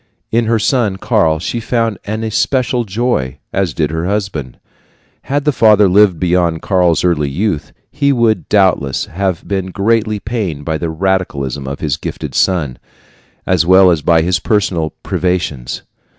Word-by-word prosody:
In 115 +1 +2
her 115 +1 +2
son 110 -3 +1
Karl 95 -8 +1
she 90 +8 -3
found 115 -2 -1
an 110 +2 -3
especial 125 +2 0
joy, 100 - -1 0.2
as 95 -4 0
did 75 +1 0
her 80 +2 -2
husband. 95 -10 -3 0.7
Had 140 +1 -1
the 150 - +3
father 105 -5 +5
lived 95 -2 +4
beyond 85 -2 +1
Karl's 90 -4 +2
early 80 -5 +1
youth, 80 -1 -2 0.2
he 140 +1 +1
would 115 -4 +1
doubtless 95 -10 +2
have 95 0 -3
been 95 -2 -2
greatly 110 +2 0
pained 100 -11 -4
by 80 -1 -2
the 85 - -2
radicalism 80 -6 -2
of 70 +1 -5
his 75 -4 -1
gifted - - -6
son, 80 -9 0 0.7
as 90 -3 +2
well 95 +1 +6
as 80 -3 0
by 80 +2 +3
his 90 -1 +1
personal 90 -5 0
privations. 85 -8 -2
95 Hz, 155 wpm, -15 LUFS, 80-110 Hz, 0.7 s, well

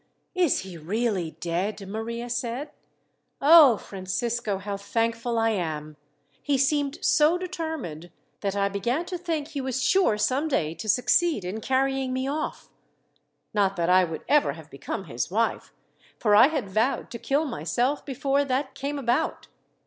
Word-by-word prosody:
"Is 360 -6 +2
he 185 -3 -9
really 190 -1 -2
dead?" 190 +4 -2
Maria 230 +3 -4
said. 245 +3 -3 0.7
"Oh, 290 -6 +8
Francisco, 205 +3 -3
how 200 +1 -4
thankful 230 +3 -1
I 225 0 +2
am! 155 -6 -3 0.5
He 285 -2 +1
seemed 275 +1 +1
so 310 +3 +4
determined, 320 - -5 0.3
that 200 -1 -2
I 200 0 +2
began 235 - -1
to 360 0 -4
think 320 -4 -3
he 290 -3 -4
was 260 -1 -2
sure 310 - +3
some 260 +8 +1
day 160 - 0
to 215 +7 -7
succeed 275 - +2
in 205 +5 -4
carrying 265 +1 0
me 260 +1 -1
off. 300 +2 -3 0.9
Not 200 -2 +2
that 170 -1 0
I 185 0 +6
would 165 -2 -4
ever 290 - +3
have 160 -1 -13
become 140 - -5
his 120 -1 -4
wife, 225 +5 -1 0.5
for 210 -3 +2
I 230 +5 +8
had 285 -8 -2
vowed 220 +7 0
to 235 - -6
kill 285 +6 0
myself 260 +1 -1
before 275 +1 0
that 265 0 -1
came 285 +1 -4
about. 245 -2 -1
235 Hz, 155 wpm, -26 LUFS, 195-280 Hz, 0.9 s, Oh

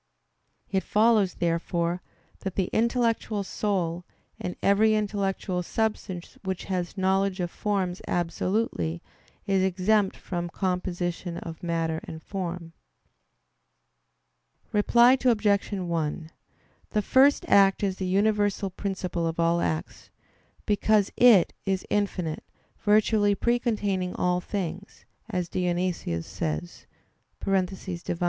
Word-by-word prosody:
It 190 -1 +2
follows, 215 -3 +3
therefore, 170 +1 -1 0.4
that 190 -2 -5
the 190 -2 -1
intellectual 230 -3 +1
soul, 180 -4 -1 0.4
and 180 - -4
every 215 +2 +4
intellectual 200 -3 -1
substance 195 -2 -3
which 190 -1 -3
has 180 0 -3
knowledge 190 0 +1
of 175 -1 -2
forms 190 -3 -1
absolutely, 170 - -1 0.4
is 195 -1 +2
exempt 190 +2 +2
from 175 -1 -4
composition 180 -1 -2
of 165 +1 -7
matter 165 -2 -1
and 160 -1 -9
form. 175 -3 -5 2.0
Reply 240 +5 +5
Obj. 210 -5 +2
1: 170 -4 -2 0.6
The 210 - +1
First 270 +6 +4
Act 195 0 +5
is 190 -2 0
the 190 - -2
universal 205 0 +1
principle 180 -3 -3
of 165 +1 -4
all 170 0 +2
acts; 80 -1 -3 0.6
because 210 0 +2
It 235 -7 +6
is 190 -1 -1
infinite, 185 -6 -1 0.4
virtually 210 -1 +3
"precontaining 205 -5 0
all 180 0 +1
things," 190 0 -5 0.2
as 180 -5 -2
Dionysius 175 - -1
says 80 +2 -4 0.6
(Div. 185 -3 -2
190 Hz, 105 wpm, -26 LUFS, 175-205 Hz, 2.0 s, It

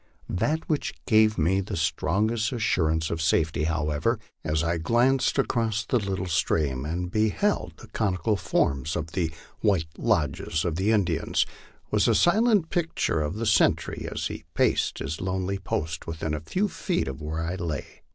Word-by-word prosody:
That 150 - -1
which 150 -3 -1
gave 110 -2 +4
me 90 +5 +2
strongest 95 +8 0
assurance 80 -9 +1
of 80 - -2
safety, 80 -1 +1
however, 75 -2 0 0.3
as 75 +1 0
I 85 0 0
glanced 120 - +2
across 115 -5 0
the 125 - +2
little 95 -3 -2
stream, 75 -5 0
and 90 +3 -3
beheld 110 - +1
the - - -12
conical 100 -1 0
forms 70 -5 0
of 80 -1 -3
the 85 -3 -1 0.3
white 95 -7 +2
lodges 75 +3 0
of 85 -2 -1
the 95 +3 +1
Indians, 95 -7 +1 0.5
was - - +3
the - - +4
silent 205 -2 +3
picture 165 - 0
of 75 +4 -2
the 115 +2 -2
sentry 110 - +2
as - - -3
he - - -4
paced - - +2
his 75 +4 -4
lonely 95 +1 -1
post 80 -3 -3
within 80 -1 -3
a 75 - -1
few 185 - -1
feet - - -2
of 65 +2 -5
where 80 +2 -3
I 85 +2 -2
lay. 85 -6 -5
90 Hz, 160 wpm, -26 LUFS, 80-110 Hz, 0.5 s, gave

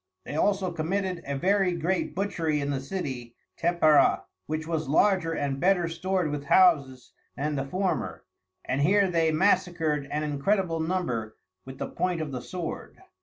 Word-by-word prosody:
_ - - -51
They - - -6
also 195 +2 +1
committed 180 +2 -2
a 140 -1 -2
very 190 +3 +2
great 175 +3 -1
Butchery 170 -6 -1
in 140 0 -2
the 135 - -1
City 130 -7 -5 0.2
Tepeara, 165 -3 +3 0.2
which 155 +1 -3
was 160 -2 -2
larger 165 +2 +3
and 140 -3 -2
better 180 0 +3
stored 180 -1 -1
with 145 -1 -4
Houses 140 -8 +3 0.3
than 150 +1 -1
the 135 -1 -2
former; 185 +5 -2 0.4
and 135 - -1
here 195 +4 +3
they 165 -2 +2
Massacred 160 -4 +1
an 150 +1 -2
incredible 165 +4 0
number 160 -11 -2 0.3
with 130 0 -9
the - - -3
point 180 -2 -1
of 155 -3 -4
the 125 -2 -4
Sword. 175 +2 -6
165 Hz, 165 wpm, -27 LUFS, 145-185 Hz, 0.4 s, Tepeara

